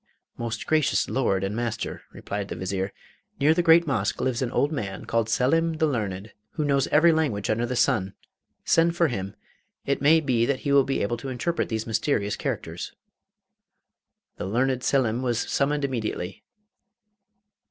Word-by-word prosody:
'Most 115 Hz, -2 st, -4 dB
gracious 155 Hz, -2 st, +2 dB
Lord 100 Hz, -8 st, +1 dB
and 100 Hz, +2 st, -2 dB
master,' 120 Hz, -1 st, -3 dB
replied 100 Hz, -1 st, -5 dB
the -, -, -5 dB
Vizier, 95 Hz, +1 st, -3 dB, 0.5 s
'near 150 Hz, +3 st, +5 dB
the 175 Hz, -, +2 dB
great 170 Hz, 0 st, +6 dB
Mosque 115 Hz, -9 st, -1 dB
lives 130 Hz, -2 st, -1 dB
a 130 Hz, +2 st, +1 dB
man 100 Hz, -11 st, -4 dB
called 115 Hz, -1 st, 0 dB
Selim 165 Hz, +8 st, +2 dB
the 160 Hz, 0 st, +1 dB
learned, 105 Hz, -7 st, -3 dB, 0.2 s
who 155 Hz, -, -1 dB
knows 140 Hz, -2 st, +2 dB
every 165 Hz, +3 st, +5 dB
language 135 Hz, -12 st, 0 dB
under 115 Hz, +2 st, 0 dB
the 125 Hz, -, -3 dB
sun. 110 Hz, -7 st, +1 dB, 0.5 s
Send 165 Hz, +1 st, +3 dB
for 170 Hz, -2 st, +3 dB
him; 100 Hz, -5 st, -4 dB, 0.5 s
it 140 Hz, -1 st, 0 dB
may 155 Hz, +3 st, +6 dB
be 130 Hz, -6 st, +1 dB
that 140 Hz, -2 st, -1 dB
he 140 Hz, -, -1 dB
will 140 Hz, -1 st, +5 dB
be 135 Hz, -, -1 dB
able 120 Hz, +4 st, -1 dB
to 135 Hz, +4 st, -6 dB
interpret 130 Hz, +7 st, -2 dB
these 110 Hz, -1 st, -2 dB
mysterious 110 Hz, -2 st, 0 dB
characters.' -, -, -4 dB, 1.4 s
The -, -, -4 dB
learned 125 Hz, +4 st, 0 dB
Selim 125 Hz, -3 st, +1 dB
was 120 Hz, -2 st, 0 dB
summoned 145 Hz, +1 st, 0 dB
immediately. 110 Hz, -7 st, -4 dB
125 Hz, 165 wpm, -25 LUFS, 110-145 Hz, 1.4 s, great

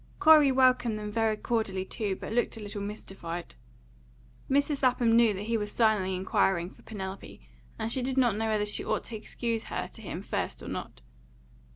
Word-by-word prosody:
Corey 305 Hz, -3 st, +7 dB
welcomed 255 Hz, -4 st, +3 dB
them 210 Hz, 0 st, -5 dB
very 220 Hz, 0 st, +1 dB
cordially 210 Hz, -5 st, -1 dB
too, 200 Hz, -1 st, -2 dB
but 215 Hz, -, -6 dB
looked 240 Hz, -1 st, 0 dB
a -, -, -7 dB
little 205 Hz, -1 st, -6 dB
mystified. 195 Hz, -4 st, -6 dB, 1.0 s
Mrs. 285 Hz, +1 st, +2 dB
Lapham 245 Hz, -3 st, +3 dB
knew 230 Hz, -2 st, +6 dB
that 195 Hz, -, -5 dB
he 230 Hz, +2 st, 0 dB
was 210 Hz, -1 st, -3 dB
silently 210 Hz, -5 st, +2 dB
inquiring 185 Hz, -1 st, +1 dB
for -, -, -19 dB
Penelope, 195 Hz, -2 st, -7 dB, 0.4 s
and 225 Hz, -, -3 dB
she 260 Hz, -, +1 dB
did 260 Hz, +1 st, -2 dB
not 240 Hz, -5 st, +4 dB
know 220 Hz, +1 st, -1 dB
whether 215 Hz, -1 st, +1 dB
she 210 Hz, -, +1 dB
ought -, -, -1 dB
to 230 Hz, -, -8 dB
excuse 225 Hz, +1 st, -3 dB
her -, -, -3 dB
to -, -, -12 dB
him -, -, -6 dB
first -, -, -3 dB
or -, -, -8 dB
not. -, -, -6 dB
220 Hz, 190 wpm, -29 LUFS, 200-240 Hz, 1.0 s, Corey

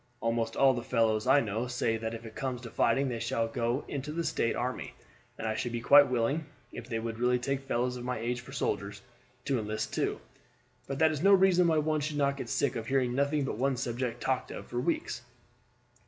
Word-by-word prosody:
Almost 115 Hz, 0 st, -1 dB
all 135 Hz, -1 st, +5 dB
the 120 Hz, -, -3 dB
fellows 115 Hz, -2 st, +1 dB
I 140 Hz, +2 st, +6 dB
know 110 Hz, +2 st, -2 dB
say 120 Hz, -2 st, 0 dB
that 110 Hz, 0 st, -3 dB
if 115 Hz, +1 st, -9 dB
it 110 Hz, -, -9 dB
comes 130 Hz, -2 st, -3 dB
to 115 Hz, -2 st, -9 dB
fighting 135 Hz, +4 st, +2 dB
they 120 Hz, -3 st, -3 dB
shall 115 Hz, 0 st, 0 dB
go 120 Hz, +3 st, -1 dB
into 140 Hz, +1 st, -4 dB
the 170 Hz, +2 st, -2 dB
State 115 Hz, -, 0 dB
army, 125 Hz, +1 st, -3 dB, 0.4 s
and 115 Hz, -, -4 dB
I 110 Hz, -, 0 dB
should 120 Hz, +2 st, -3 dB
be 120 Hz, -, -2 dB
quite 145 Hz, +4 st, +7 dB
willing, 130 Hz, +5 st, 0 dB, 0.2 s
if 120 Hz, -, -9 dB
they 115 Hz, -, -1 dB
would 115 Hz, 0 st, -4 dB
really 125 Hz, +1 st, +3 dB
take 135 Hz, +2 st, -3 dB
fellows 125 Hz, 0 st, 0 dB
of 120 Hz, -, -7 dB
my 125 Hz, 0 st, -2 dB
age 120 Hz, +2 st, -2 dB
for 120 Hz, -, -12 dB
soldiers, 100 Hz, 0 st, -3 dB, 0.4 s
to 135 Hz, -3 st, +1 dB
enlist 110 Hz, 0 st, -3 dB
too; -, -, -1 dB, 0.7 s
but 135 Hz, -, -3 dB
that 160 Hz, +2 st, +4 dB
is 150 Hz, -2 st, -3 dB
no 200 Hz, +2 st, +6 dB
reason 185 Hz, -2 st, +4 dB
why 160 Hz, -1 st, +3 dB
one 155 Hz, 0 st, +1 dB
should 150 Hz, 0 st, -3 dB
not 140 Hz, -1 st, +1 dB
get -, -, -5 dB
sick 140 Hz, -, 0 dB
of 115 Hz, -1 st, -4 dB
hearing 130 Hz, -2 st, +1 dB
nothing 140 Hz, +2 st, +1 dB
but 120 Hz, -, -4 dB
one 135 Hz, 0 st, +1 dB
subject 120 Hz, -1 st, -3 dB
talked 130 Hz, -1 st, -1 dB
of -, -, -7 dB
for 120 Hz, -, -4 dB
weeks." 130 Hz, -3 st, -1 dB
125 Hz, 230 wpm, -30 LUFS, 115-140 Hz, 0.7 s, quite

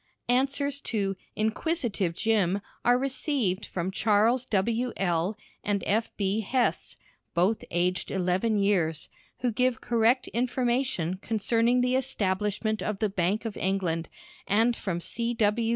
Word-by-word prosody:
Answers 275 Hz, +3 st, +2 dB
to 200 Hz, -4 st, -1 dB, 0.2 s
"Inquisitive 220 Hz, -, 0 dB
Jim" 200 Hz, -2 st, +1 dB, 0.2 s
are 245 Hz, 0 st, +5 dB
received 255 Hz, -, -1 dB
from 180 Hz, +1 st, -3 dB
Charles 220 Hz, +5 st, +2 dB
W. 230 Hz, +5 st, 0 dB
L., 180 Hz, +2 st, 0 dB, 0.3 s
and 205 Hz, -1 st, 0 dB
F. 220 Hz, +3 st, +1 dB
B. 200 Hz, +1 st, 0 dB
Hesse 245 Hz, +4 st, 0 dB, 0.4 s
(both 185 Hz, +6 st, +2 dB
aged 180 Hz, +1 st, 0 dB
eleven 190 Hz, +4 st, +1 dB
years), 175 Hz, -6 st, +1 dB, 0.3 s
who 245 Hz, -1 st, +1 dB
give 250 Hz, +1 st, +1 dB
correct 235 Hz, +2 st, +2 dB
information 240 Hz, -7 st, 0 dB
concerning 230 Hz, +4 st, +1 dB
the 250 Hz, +1 st, +2 dB
establishment 215 Hz, -3 st, 0 dB
of 210 Hz, -2 st, -2 dB
the 215 Hz, +1 st, 0 dB
Bank 195 Hz, +3 st, 0 dB
of 225 Hz, -, -4 dB
England, 180 Hz, -4 st, -1 dB, 0.4 s
and 225 Hz, +4 st, +3 dB
from 185 Hz, -6 st, -3 dB
C. 235 Hz, +6 st, -2 dB
W. 225 Hz, +1 st, +2 dB
215 Hz, 130 wpm, -27 LUFS, 190-240 Hz, 0.4 s, are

